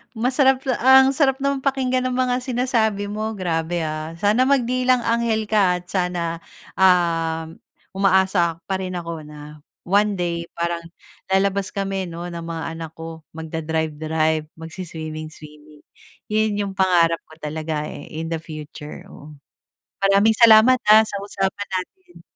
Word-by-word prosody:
Masarap 260 +3 +2 0.2
ang 265 +1 +7
sarap 270 -2 +2
naman 280 -1 +1
pakinggan 260 -2 0
ng 255 - -2
mga 250 -1 +1
sinasabi 235 -5 0
mo, 215 +1 -3
grabe 170 -2 -2
ha. 155 +1 -4
Sana 210 +6 +3
magdilang-anghel 240 -3 +1
ka 200 -4 +3
at 180 - -18
sana, 175 -3 -1 0.4
um, 165 -3 +2 0.4
umaasa 190 -3 +2
pa 190 -1 -1
rin 185 -1 -4
ako 165 -2 -5
na 150 0 -11 0.3
one 205 +2 +2
day 170 -1 -2
parang 170 0 -2 0.5
lalabas 195 0 +1
kami 195 -1 -2
'no, 170 +1 -6
ng 170 - -6
mga 165 -1 -5 0.2
anak 165 -2 -6
ko, 165 -1 -9
magda-drive-drive, 160 -1 -2
magsi-swimming-swimming. 155 -3 -9 0.5
Yun 215 0 +2
'yung 200 -1 -2
pangarap 170 -3 +3
ko 160 - -15
talaga 155 0 -3
eh - - -9
in 160 +1 -5
the 165 - -1
future, 155 -2 -9
oo. 150 +1 -12 0.7
Maraming 200 +3 +4
salamat 230 +2 +7
ha, 215 +1 +8
sa 215 - -5
usapan 200 0 -3
natin. 350 - -6
185 Hz, 135 wpm, -22 LUFS, 160-220 Hz, 0.7 s, ha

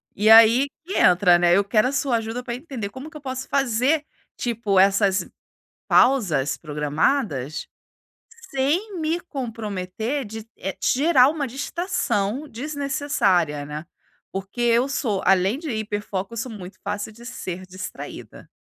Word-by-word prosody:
E 210 +2 +2
aí 230 +5 +8 0.2
que 380 - -3
entra, 180 -1 +5
né? 175 0 +4
Eu 200 - +4
quero 215 +4 +2
a - - -1
sua 275 -4 +1
ajuda 225 +2 -4
pra 235 - -4
entender 250 -7 -6
como 265 +7 -9
que 310 - -10
eu - - -13
posso 260 -1 -5
fazer, 275 +3 +1 0.3
tipo, 225 -5 0
essas 195 -1 +3 0.6
pausas 165 - +3
programadas 150 - -1 0.8
sem 340 +8 -1
me 320 +2 0
comprometer 225 - -4
de, 220 +1 -8
eh, 190 0 -5
gerar 275 -1 +5
uma 295 -3 -2
distração 275 - -2
desnecessária, 255 - 0
né? 150 +2 -6 0.5
Porque 195 +5 -5
eu 240 +2 +3
sou, 220 -8 -1
além 195 +5 +3
de 320 0 -6
hiperfoco, 210 -1 -4
sou 240 +2 -4
muito 190 -2 -9
fácil 205 +1 -3
de 235 +2 -14
ser 185 -7 -6
distraída. 185 0 -9
225 Hz, 140 wpm, -23 LUFS, 190-275 Hz, 0.8 s, aí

